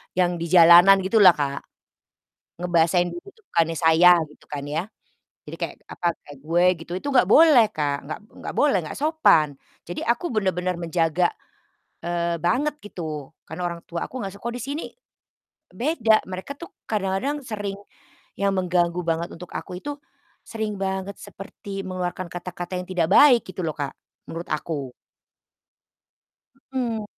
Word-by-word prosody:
yang 180 -1 +2
di 170 - -3
jalanan 175 +3 +8
gitu 195 +4 +1
lah 180 - +9
Kak, 140 -1 -3 1.0
ngebahasain 175 0 +2
diri 350 - -9
tuh 445 +1 -29
bukannya 165 -1 +1
"Saya," 165 +2 +6 0.2
gitu 150 - -20
kan 145 -1 -5
ya. 155 +5 -2 0.6
Jadi - - -8
kayak, - - -4
apa, 175 - -4 0.2
kayak 145 -1 -13
"Gue" 170 +3 +2
gitu, 165 +1 -10
itu 285 - -6
nggak 265 -2 +4
boleh 300 -8 +7
Kak, 145 -2 0
nggak 155 - -5 0.2
nggak - - -6
boleh, 285 -10 +3
nggak - - -7
sopan. 280 - +3 0.3
Jadi, 175 - -5
aku 240 +9 +1
bener-bener 185 -3 0
menjaga, 170 0 0 0.7
eee, 170 0 -1
banget, 260 - 0
gitu. 155 - -7 0.2
Karena 160 +3 -7
orang 170 -1 -6
tua 170 0 -4
aku - - -15
nggak 195 - -4
suka, 200 - -16
kalau 235 - -4
di - - -6
sini 285 +4 -4 0.9
beda, 230 - +2
mereka 185 +8 -6
tuh 340 - -10 0.2
kadang-kadang 215 +8 -1
sering 205 -3 -4 0.6
yang 200 0 +1
mengganggu 180 -1 +1
banget 165 +1 -1
untuk 180 +1 -11
aku 180 - -6
itu 290 +8 -6 0.5
sering 220 -2 -4
banget 190 +1 -3
seperti 195 0 -8
mengeluarkan 185 0 -4
kata-kata 180 +1 -5
yang 180 - -8
tidak 170 -3 +1
baik 260 -5 +7
gitu 185 0 -6
loh 155 - -2
Kak, 140 -2 -4 0.3
menurut 170 +1 -7
aku. 150 -3 -3 1.8
Mhm. 235 -5 -2
180 Hz, 155 wpm, -23 LUFS, 170-215 Hz, 1.8 s, lah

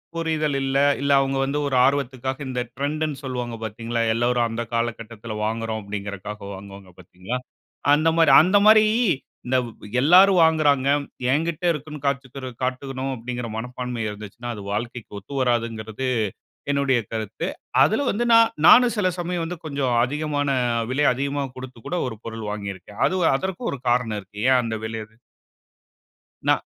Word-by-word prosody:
புரிதல் 155 -3 0
இல்ல 135 0 0 0.2
இல்ல, 140 - +1
அவங்க 135 0 0
வந்து 140 +2 -1
ஒரு 135 - -1
ஆர்வத்துக்காக 130 -1 -1
இந்த 125 -1 -3 0.2
ட்ரெண்ட்ன்னு 150 +1 -2
சொல்வாங்க 125 -3 -4
பாத்தீங்களா? 115 +2 -3
எல்லாரும் 120 +1 +1
அந்த 115 +1 -3
காலக்கட்டத்துல 115 -1 -3
வாங்குறோம் 110 0 -2
அப்டின்றதுக்காக 100 0 -6
வாங்குவாங்க 100 -1 -11
பாத்தீங்களா? 90 +7 -6 0.6
அந்த 155 +2 +3
மாரி 165 - +5
அந்த 185 +5 +4
மாரி 215 0 +8 0.6
இந்த 130 +1 +2
வ் 115 - -9 0.3
எல்லாரும் 185 +5 +6
வாங்குறாங்க. 145 -4 +3 0.4
என்கிட்ட 165 +3 -1
இருக்குன்னு 150 -1 -6
காட்டிக்கிட 130 -1 -3
காட்டனும் 130 +1 -3
அப்படிங்குற 120 0 -5
மனப்பான்ம 125 0 -4
இருந்துச்சுனா 105 +3 -7
அது 105 - -8
வாழ்க்கைக்கு 115 -1 -5
ஒத்துவராதுங்குறது 115 0 -2 0.7
என்னுடைய 140 -3 +2
கருத்து. 110 -3 -3 0.4
அதுல 220 - +1
வந்து 235 +4 -1
நான் 230 0 +6
நானும் 245 +1 +7
சில 185 -3 +2
சமயம் 175 -1 -2
வந்து 175 +1 -5
கொஞ்சம் 140 -4 -1
அதிகமான 145 +1 -1 0.4
விலை 145 +3 +2
அதிகமா 140 +2 -2
குடுத்து 130 -1 -9
கூட 180 - -1
ஒரு 110 - -7
பொருள் 115 -2 -6
வாங்கியிருக்கேன். 100 -1 -7
அது 185 - 0 0.2
அதற்கும் 190 - -3
ஒரு 140 - -5
காரணம் 120 -4 +1
இருக்கு. 100 +2 -15
ஏன் 130 -1 +5
அந்த 110 -1 -3
விலை 110 0 -4
அது 110 +1 -28 1.3
நான் - - +3
130 Hz, 145 wpm, -23 LUFS, 115-145 Hz, 1.3 s, மாரி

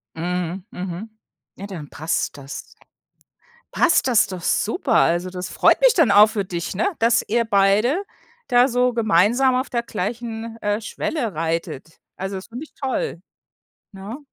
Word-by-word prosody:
Mhm, 180 +2 -3
mhm. 185 +4 -6 0.5
Ja, 200 - -7
dann 165 -8 -8
passt 155 -1 -2
das. 135 0 -7 1.1
Passt 335 - +3
das 240 -5 +4
doch 185 -3 -7
super. 230 - 0
Also, 175 -3 +3
das 180 0 -6
freut - - +3
mich - - +6
dann 315 - +4
auch 205 +1 +8
für 210 -3 -2
dich, 170 -2 -4
ne, 385 - +1
dass 230 +1 +3
ihr 235 +2 +1
beide 215 - +2 0.4
da 245 +1 +5
so 250 -1 +1
gemeinsam 230 +5 +3
auf 255 +2 -1
der 235 -2 -1
gleichen, 225 +2 -5
äh, 205 +1 -1
Schwelle 235 - -3
reitet. 160 -1 -4 0.2
Also, 190 +1 -5
das 190 - -7
finde 245 +5 -7
ich - - -24
toll, 260 - -2 0.7
ne? 200 +6 -8
210 Hz, 155 wpm, -22 LUFS, 180-240 Hz, 1.1 s, auch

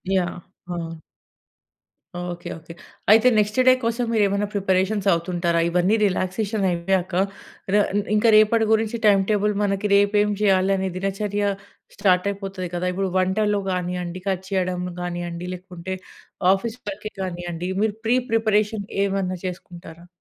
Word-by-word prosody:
Yeah! 180 -1 -1 0.4
ఆ! 165 -1 -5 1.2
Okay. 175 -1 -5
Okay. 165 +1 -12 0.4
అయితే 220 +3 +6
next 210 +1 +1
day 255 - +9
కోసం, 230 +1 0
మీరేమన్నా 205 -1 +2
ప్రిపరేషన్స్ 195 +1 +1
అవుతుంటారా? 170 0 0
ఇవన్నీ 180 +4 +2
రిలాక్సేషనయ్యాక. 190 -2 0 0.6
రా 205 - +5
ఇం 205 - +3
ఇంక 210 - +1
రేపటి 220 +1 +4
గురించి 220 +1 0
టైమ్ 200 -2 +5
టేబుల్, 210 0 +2
మనకి 200 0 0
రేపేం 205 +1 +3
జేయాలనే 190 -1 +2
దినచర్య 200 +2 -2 0.5
స్టార్టయిపోతది 195 0 0
కదా! 175 +1 -2
ఇప్పుడు 190 +1 -1
వంటలు 205 +3 +1
గానీయండి, 180 0 -3
కట్ 190 -1 -1
చేయడం 185 -2 -1 0.2
గానీయండి, 175 0 -4
లేకుంటే, 180 0 -7 0.6
ఆఫీస్ 220 +4 -3
వర్కే 210 +2 -6
గానీయండి. 175 -1 -4
మీరు 215 -1 +1
ప్రీ 235 +2 +3 0.2
ప్రిపరేషన్ 215 -2 +1 0.2
ఏమన్నా 195 -2 -1
చేసుకుంటారా? 175 -2 -8
190 Hz, 120 wpm, -23 LUFS, 180-210 Hz, 1.2 s, day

